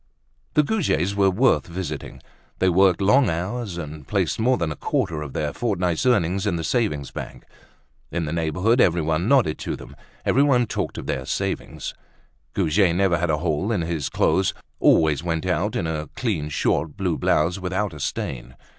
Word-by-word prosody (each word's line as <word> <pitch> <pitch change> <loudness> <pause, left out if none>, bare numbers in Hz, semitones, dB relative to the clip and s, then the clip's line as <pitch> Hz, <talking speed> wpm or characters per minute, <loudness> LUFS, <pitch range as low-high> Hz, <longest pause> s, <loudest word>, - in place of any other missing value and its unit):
The 150 - +5
Goujets 140 - 0
were 100 -1 +3
worth 120 +7 +2
visiting. 85 -5 -6 0.3
They 95 - +3
worked 95 +1 +4
long 125 +8 +4
hours, 95 +4 -3
and 75 -3 -7
placed - - 0
more 125 +3 +3
than 85 -3 -1
a - - -4
quarter 80 +2 -1
of 70 -3 -7
their 75 -1 -2
fortnight's 90 -4 0
earnings 95 -4 +2
in 95 - +1
the 80 - -3
savings 80 - -1
bank. - - -8 0.7
In 85 -1 -1
the 75 - -3
neighborhood 90 - +2
everyone 80 +1 +2
nodded 125 - +3
to - - -3
them, - - -12 0.3
everyone 135 -2 +4
talked - - -3
of - - -6
their 65 0 -3
savings. - - -3 0.6
Goujet 85 +2 +3
never 90 -2 +2
had 90 0 0
a 75 - +2
hole 80 +6 -1
in 105 -6 +1
his 80 -3 -2
clothes, 95 -1 +1 0.2
always 75 -3 +4
went 80 -2 -2
out - - 0
in - - -1
a 80 -1 -3
clean 90 -12 -1
short 75 +1 0
blue 90 -4 0
blouse, 85 +5 +2
without 95 +1 -2
a 75 - -9
stain. 60 -2 -4
85 Hz, 175 wpm, -23 LUFS, 80-100 Hz, 0.7 s, The